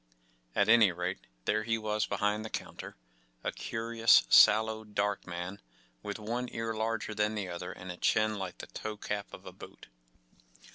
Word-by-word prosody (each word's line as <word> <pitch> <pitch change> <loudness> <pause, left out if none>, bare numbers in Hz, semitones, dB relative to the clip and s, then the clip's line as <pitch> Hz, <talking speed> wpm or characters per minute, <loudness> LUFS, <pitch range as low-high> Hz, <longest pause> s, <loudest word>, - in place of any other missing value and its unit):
At - - +3
any 110 -3 +7
rate, 90 -5 -4 0.2
there 110 - +2
he 115 +1 0
was 105 -1 -1
behind 105 +1 0
the 110 - -6
counter—a - - -8
curious, 115 - +3
sallow, 110 +1 +6
dark 105 -2 -2
man, 90 +2 -5 0.4
with 100 - -5
one 120 +3 -3
ear 115 0 -3
larger 110 0 -2
than 105 +1 0
the 100 -3 -3
other 90 +1 -5
and 90 0 -8
a 90 - -8
chin 110 +1 +2
like 95 -2 -5
the - - -7
toe 110 -1 -6
cap 100 -1 -4
of - - -11
a - - -7
boot. - - -13
105 Hz, 170 wpm, -31 LUFS, 90-110 Hz, 0.4 s, any